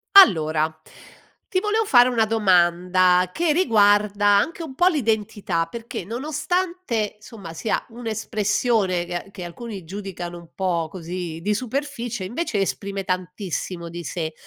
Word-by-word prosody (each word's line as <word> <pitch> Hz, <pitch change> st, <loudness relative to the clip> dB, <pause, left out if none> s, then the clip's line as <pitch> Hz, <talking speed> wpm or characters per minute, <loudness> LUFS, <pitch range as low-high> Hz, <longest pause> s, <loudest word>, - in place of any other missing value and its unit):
Allora, 155 Hz, -, +6 dB, 0.7 s
ti 370 Hz, -, +1 dB
volevo 435 Hz, +2 st, +1 dB
fare 245 Hz, -8 st, +6 dB
una 230 Hz, -3 st, +2 dB
domanda 180 Hz, -3 st, +3 dB
che 325 Hz, -, +1 dB
riguarda 205 Hz, -, +3 dB
anche 205 Hz, +13 st, +3 dB
un 305 Hz, -5 st, -7 dB
po' 350 Hz, +6 st, +4 dB
l'identità, 210 Hz, -, 0 dB
perché 230 Hz, +2 st, -6 dB
nonostante 295 Hz, -, -2 dB
somma 200 Hz, -6 st, -10 dB
sia 210 Hz, +6 st, -1 dB
un'espressione 215 Hz, -4 st, 0 dB
che 175 Hz, +2 st, -5 dB
che 190 Hz, -3 st, -8 dB
alcuni 195 Hz, 0 st, -8 dB
giudicano 180 Hz, -2 st, -6 dB
un 170 Hz, -1 st, -13 dB
po' 170 Hz, -4 st, -1 dB
così 175 Hz, -2 st, -5 dB
di 210 Hz, +4 st, +1 dB
superficie, 240 Hz, -3 st, -3 dB
invece 235 Hz, -, -2 dB
esprime 195 Hz, 0 st, -2 dB
tantissimo 180 Hz, -1 st, -3 dB
di 170 Hz, +1 st, -7 dB
sé. 160 Hz, 0 st, -4 dB
205 Hz, 130 wpm, -23 LUFS, 180-235 Hz, 0.7 s, Allora